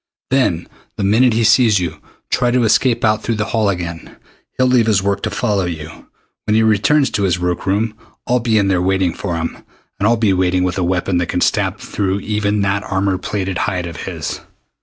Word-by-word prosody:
Then 110 -11 +1 0.3
the - - -2
minute 115 +5 +4
he 115 +1 +1
sees 110 -1 +5
you, 85 -4 -3 0.3
try 125 - +2
to 125 0 +2
escape 115 +2 +2
out 110 0 +2
through 115 - -2
the 110 0 -1
hall 110 -3 +2
again. 85 -3 -5 0.4
He'll 130 - +3
leave 125 -3 +3
his 100 -3 +2
work 100 0 0
to - - -2
follow 105 -6 0
you. 80 -2 -7 0.4
When 105 - +1
he 110 - +4
returns 110 +7 +3
to 105 -2 -1
his 90 -4 +1
work 90 +1 -2
room 105 +3 0 0.3
I'll 125 +1 +2
be 115 -2 +1
in 100 -2 +2
there 95 -2 +1
waiting 95 -2 +1
for 90 -4 -4
him. 80 0 -3 0.4
And 105 - +2
I'll 115 +1 +3
be 110 -3 +2
waiting 90 0 +1
with 90 +1 -1
a - - 0
weapon 90 +1 0
that 85 0 0
can 90 - -1
stab - - +1
through 100 0 -2
even 105 0 -1
that 100 0 0
armor 95 -1 -1
plated 95 -3 -3
hide 90 -1 -1
of 85 -2 -7
his!" - - -4
100 Hz, 215 wpm, -17 LUFS, 90-110 Hz, 0.4 s, sees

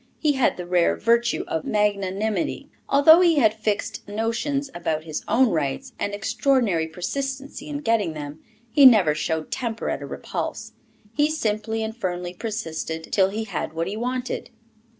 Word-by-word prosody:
He 305 - +2
had 265 -3 +1
the 180 - -5
rare 175 -1 +2
virtue 235 +2 +2
of 160 - -2
magnanimity. 210 - -1 0.2
Although 315 +5 +7
he 340 -2 +5
had 220 -7 +4
fixed 215 -2 -3
notions 230 +7 -1
about 160 -3 -2
his 155 -2 -5
own 255 +1 +4
rights, 140 -5 -2
and 205 - -1
extraordinary 215 - +1
persistency 270 - -5
in 290 -1 -4
getting 225 - +1
them, 150 0 -7 0.3
he 280 +1 +8
never 200 -11 +5
showed 155 +1 -2
temper 230 -3 -2
at - - -3
a - - -6
repulse; - - -5 0.4
he 295 +1 +3
simply 220 -6 -1
and 220 0 -4
firmly 180 -5 -3
persisted 165 -6 -4
till 190 -2 +4
he 215 +3 -3
had 195 -6 -4
what 165 +1 -1
he 200 - -4
wanted. 250 +2 -3
215 Hz, 160 wpm, -24 LUFS, 175-255 Hz, 0.4 s, he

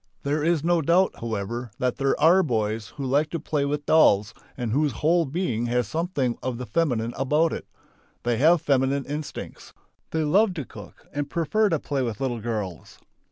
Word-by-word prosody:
There 145 +2 0
is 165 -2 +2
no 170 0 +2
doubt 175 +5 +2
however, 115 +2 -4
that 125 -1 -1
there 135 -1 +1
are 175 +4 +6
boys 110 - -1
who 140 - -3
like 145 +4 +2
to 165 - -3
play 150 -2 -1
with 145 +1 -2
dolls 105 -9 +4 0.2
and 120 -4 -2
whose 145 +2 +1
whole 165 +6 +2
being 130 -7 -1
has 120 0 0
something 155 -7 -1
of 125 -1 -3
the 125 - -5
feminine 120 -7 0
about 150 +5 +2
it. - - -6 0.6
They 120 -1 +1
have 160 +5 +4
feminine 135 0 +1
instincts. 145 +1 -7 0.4
They 160 -1 -1
love 190 +6 +3
to 150 -5 -4
cook - - -13
and 145 -1 -3
prefer 205 +7 +1
to 165 - +1
play 140 -2 -2
with 115 -4 -3
little 120 -4 -2
girls. 105 -6 -5
140 Hz, 185 wpm, -25 LUFS, 120-160 Hz, 0.6 s, are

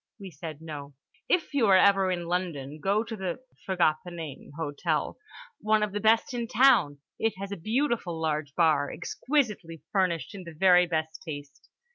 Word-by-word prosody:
We 195 -2 -9
said 160 -2 -8
no. 145 -3 -8 0.3
"If 340 -4 +1
you 260 -6 +3
are 190 -1 +7
ever 195 -1 +4
in 175 -2 -2
London, 165 -5 -3
go 200 +7 +1
to 225 -1 -6
the" 190 -4 -2
(I 255 0 -33
forget 175 -5 +2
the 180 - -8
name) 165 -5 -8
"Hotel—one 215 - -2
of 210 - -1
the 205 - -2
best 220 +4 +3
in 235 -1 -2
town. 220 - +4 0.2
It 225 0 0
has 195 +1 -6
a - - -2
beautiful 220 - -1
large 155 -2 -2
bar, 155 -4 +3
exquisitely 210 - -2
furnished 185 -2 0
in 195 -2 -8
the 170 -2 -10
very 180 0 +5
best 160 -1 -2
taste. 145 -3 -9
180 Hz, 175 wpm, -28 LUFS, 160-215 Hz, 0.3 s, are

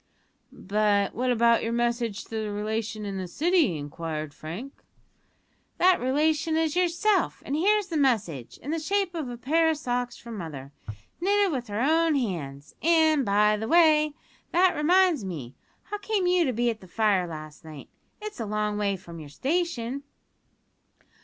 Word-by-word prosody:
"But 205 0 0
what 250 +2 -1
about 235 -1 +4
your 230 - -2
message 235 -3 -1
to - - -20
the 220 -2 -3
relation 215 +1 -3
in 195 -1 -4
the 185 - -4
City?" 305 - +2
inquired 155 0 -5
Frank. 185 - -7 1.0
"That 365 0 +4
relation 310 +4 +1
is 320 -1 0
yourself, 365 +4 +1
and 280 - -2
here's 410 +6 +3
the 325 - -1
message, 215 - 0
in 285 - -4
the 325 - -1
shape 390 +3 0
of 310 -7 -4
a 240 - -6
pair 320 +7 +2
o' - - +3
socks 245 -5 -3
from 235 -2 -9
mother; 140 -5 -7 0.5
knitted 400 +1 +2
with 250 -4 -3
her 210 +2 -3
own 320 +3 +3
hands; 150 - -4
and, 315 -3 +4
by 210 0 +3
the 220 +1 -4
way, 305 -2 +4 0.4
that 360 +1 +4
reminds 345 - +3
me 150 -10 -6 0.3
how 415 - -6
came 410 -2 -1
you 355 -1 +3
to 260 - +1
be 240 0 +1
at 220 - -9
the 185 - -13
fire 200 -2 +1
last 155 -2 -9
night? 155 -3 -10 0.3
It's 425 - -7
a 225 - -2
long 210 0 -1
way 200 -2 0
from 170 -2 -11
your 150 -2 -10
station." 275 - -2
240 Hz, 170 wpm, -26 LUFS, 200-325 Hz, 1.0 s, about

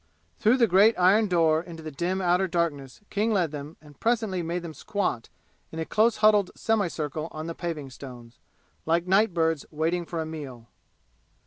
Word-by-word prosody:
Through 230 +4 +4
the 240 - +5
great 205 +3 +5
iron 200 +4 +4
door 165 -3 +3
into 165 -3 -9
dim 180 +6 -2
outer 180 +2 +2
darkness 160 -6 -2
King 215 +3 +1
led 180 -7 +1
them 150 +2 -8
and 145 -2 -18
presently 220 -6 0
made 170 +1 -3
them 165 -2 -7
squat 155 - -3 0.4
in 160 - -8
a 160 - -2
close 220 +5 +2
huddled 210 -3 +5
semicircle 160 -8 -1
on 155 0 -7
the 165 - -4
paving 160 -6 -5
stones, 125 -2 -11 0.5
like 170 +1 +2
night 195 +3 +3
birds 165 -3 0
waiting 165 +3 -1
for 170 - -4
a 160 - -2
meal. 135 -8 -8
170 Hz, 175 wpm, -26 LUFS, 155-190 Hz, 0.5 s, the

